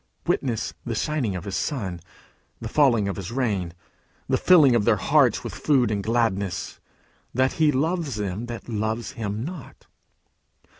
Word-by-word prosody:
Witness 120 Hz, -5 st, -1 dB
the 120 Hz, -2 st, -3 dB
shining 125 Hz, -6 st, -1 dB
of 90 Hz, -, -5 dB
his 100 Hz, -1 st, -4 dB
sun 130 Hz, -10 st, -2 dB
and 85 Hz, -1 st, -9 dB, 0.6 s
the 115 Hz, -, -5 dB
falling 120 Hz, -6 st, +3 dB
of 100 Hz, -, -3 dB
his 95 Hz, +1 st, -6 dB
rain, 105 Hz, -9 st, -1 dB, 0.6 s
the -, -, +2 dB
filling 155 Hz, -8 st, +6 dB
of 115 Hz, -, +2 dB
their 115 Hz, 0 st, +4 dB
hearts 135 Hz, +1 st, +3 dB
with 120 Hz, -, -6 dB
food 130 Hz, -7 st, +2 dB
and 100 Hz, -1 st, -1 dB
gladness, 105 Hz, -5 st, -1 dB, 0.6 s
that 130 Hz, +1 st, +2 dB
he 155 Hz, -1 st, +5 dB
loves 155 Hz, -, -1 dB
them 105 Hz, +2 st, -3 dB
that 120 Hz, -1 st, -7 dB
love 110 Hz, 0 st, -2 dB
him 110 Hz, -1 st, -4 dB
not. 165 Hz, -5 st, -9 dB
115 Hz, 160 wpm, -24 LUFS, 105-135 Hz, 0.6 s, filling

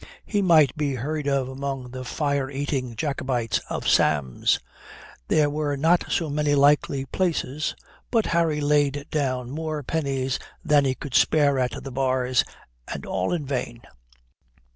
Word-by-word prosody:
He 205 Hz, -2 st, 0 dB
might 160 Hz, -8 st, +5 dB
be 145 Hz, -3 st, -1 dB
heard 145 Hz, +4 st, -3 dB
of 135 Hz, -2 st, +1 dB
among 130 Hz, -1 st, -5 dB
the 130 Hz, 0 st, -6 dB
fire 140 Hz, 0 st, -1 dB
eating 135 Hz, -3 st, -3 dB
Jacobites 130 Hz, -4 st, -1 dB
of -, -, -3 dB
Sam's. 70 Hz, -5 st, +2 dB, 0.7 s
There 150 Hz, -1 st, +3 dB
were 145 Hz, -1 st, -1 dB
not 165 Hz, +5 st, +2 dB
so 165 Hz, -, +1 dB
many 145 Hz, 0 st, +1 dB
likely 140 Hz, -1 st, +3 dB
places, 155 Hz, -2 st, -1 dB, 0.3 s
but 225 Hz, -3 st, +2 dB
Harry 165 Hz, -3 st, +1 dB
laid 145 Hz, -1 st, +2 dB
down 130 Hz, -4 st, -1 dB
more 155 Hz, 0 st, -3 dB
pennies 135 Hz, -3 st, -1 dB, 0.3 s
than 145 Hz, -2 st, +4 dB
he 130 Hz, -1 st, +1 dB
could 140 Hz, -2 st, -8 dB
spare 145 Hz, -2 st, +4 dB
at 125 Hz, -2 st, -2 dB
the 135 Hz, -, -7 dB
bars, 130 Hz, -1 st, +1 dB, 0.4 s
and -, -, -6 dB
all 95 Hz, 0 st, -1 dB
in 165 Hz, -5 st, -1 dB
vain. 125 Hz, -3 st, -4 dB
140 Hz, 145 wpm, -24 LUFS, 130-150 Hz, 0.7 s, might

